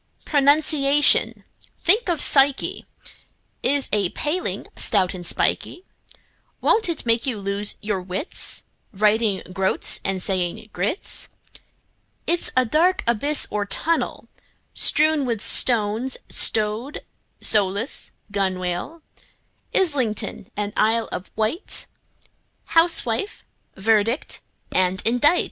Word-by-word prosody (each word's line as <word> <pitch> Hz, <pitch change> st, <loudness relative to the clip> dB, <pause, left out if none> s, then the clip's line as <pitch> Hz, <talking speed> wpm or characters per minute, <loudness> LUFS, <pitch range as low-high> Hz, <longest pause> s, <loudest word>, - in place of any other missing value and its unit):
Pronunciation—think 295 Hz, -, +2 dB
of 335 Hz, -3 st, 0 dB
psyche!— 275 Hz, -1 st, +3 dB, 0.7 s
Is 285 Hz, -1 st, +2 dB
a 200 Hz, -4 st, +2 dB
paling, 315 Hz, -, -3 dB
stout 190 Hz, -4 st, +1 dB
and 180 Hz, -2 st, -8 dB
spikey; 355 Hz, -, -1 dB, 0.7 s
Won't 440 Hz, -4 st, +2 dB
it 330 Hz, -, -3 dB
make 230 Hz, +3 st, +1 dB
you 245 Hz, -5 st, -2 dB
lose 200 Hz, +1 st, -1 dB
your 205 Hz, -3 st, -2 dB
wits, 185 Hz, -, -2 dB, 0.3 s
Writing 210 Hz, 0 st, +1 dB
"groats" 190 Hz, 0 st, 0 dB
and 195 Hz, -1 st, -1 dB
saying 185 Hz, +3 st, -2 dB
groats? 200 Hz, -, -3 dB, 1.0 s
It's 345 Hz, 0 st, 0 dB
a 255 Hz, -, +5 dB
dark 335 Hz, +10 st, +2 dB
abyss 280 Hz, +6 st, +2 dB
or 205 Hz, -1 st, -2 dB
tunnel, 330 Hz, +9 st, -1 dB, 0.5 s
Strewn 310 Hz, -1 st, +3 dB
with 235 Hz, -4 st, -2 dB
stones, 225 Hz, +3 st, 0 dB
like 220 Hz, +6 st, -1 dB, 0.4 s
rowlock, 205 Hz, +4 st, 0 dB, 0.2 s
gunwale, 190 Hz, -, -2 dB, 0.7 s
Islington 255 Hz, -, 0 dB
and 205 Hz, 0 st, -3 dB
Isle 225 Hz, +1 st, +1 dB
of 180 Hz, -, -6 dB
Wight, 220 Hz, -, -1 dB, 0.8 s
Housewife, 330 Hz, -, +2 dB, 0.3 s
verdict 220 Hz, +5 st, 0 dB, 0.3 s
and 185 Hz, 0 st, +1 dB
indict! 245 Hz, +9 st, +3 dB
225 Hz, 100 wpm, -22 LUFS, 200-295 Hz, 1.0 s, a